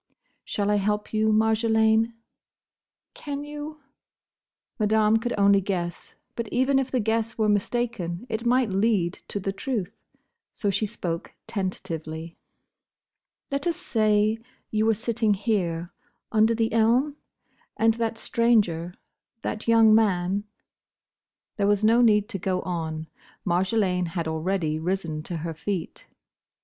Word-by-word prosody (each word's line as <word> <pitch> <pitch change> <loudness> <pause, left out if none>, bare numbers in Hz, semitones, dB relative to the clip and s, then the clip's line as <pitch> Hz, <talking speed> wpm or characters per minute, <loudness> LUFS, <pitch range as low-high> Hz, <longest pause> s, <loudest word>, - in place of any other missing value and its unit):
"Shall 205 0 -1
I 210 - +3
help 210 +1 -1
you, 215 0 +2
Marjolaine?" 220 +1 +3 1.0
"Can 285 -1 -5
you?" 295 +1 -7 1.0
Madame 215 +1 +4
could 240 +2 -2
only 200 0 +5
guess; 175 -3 -4 0.2
but 235 -1 -3
even 260 +4 +2
if 265 -1 -2
the 255 - 0
guess 225 +1 -1
were 215 -1 +2
mistaken, 210 -3 -1
it 225 -1 -3
might 245 -2 +2
lead 195 -3 +2
to 205 - -3
the 195 0 -2
truth. 200 -3 -3 0.6
So 205 - -1
she 215 +2 0
spoke 170 -4 -5
tentatively. 165 -4 -4 1.2
"Let 280 +4 -1
us 340 - +1
say, 215 -1 +2 0.3
you 215 0 +1
were 225 - +4
sitting 225 -1 +1
here, 180 -5 -1 0.4
under 220 +1 +4
the 225 -1 0
elm? 245 +6 +3 0.6
And 225 0 +4
that 230 0 -2
stranger, 205 -9 +1 0.5
that 215 +1 -4
young 225 -1 +6
man—" 200 -2 +2 1.1
There 200 -2 +2
was 205 +1 +2
no 230 +2 +5
need 210 -3 +4
to 195 -4 -4
go 185 0 -1
on. 160 -3 -3 0.4
Marjolaine 185 0 +1
had 165 -1 -3
already 160 -1 -1
risen 165 -3 -2
to 170 +2 -5
her 165 +1 -4
feet. 175 +1 -5
210 Hz, 130 wpm, -25 LUFS, 185-225 Hz, 1.2 s, young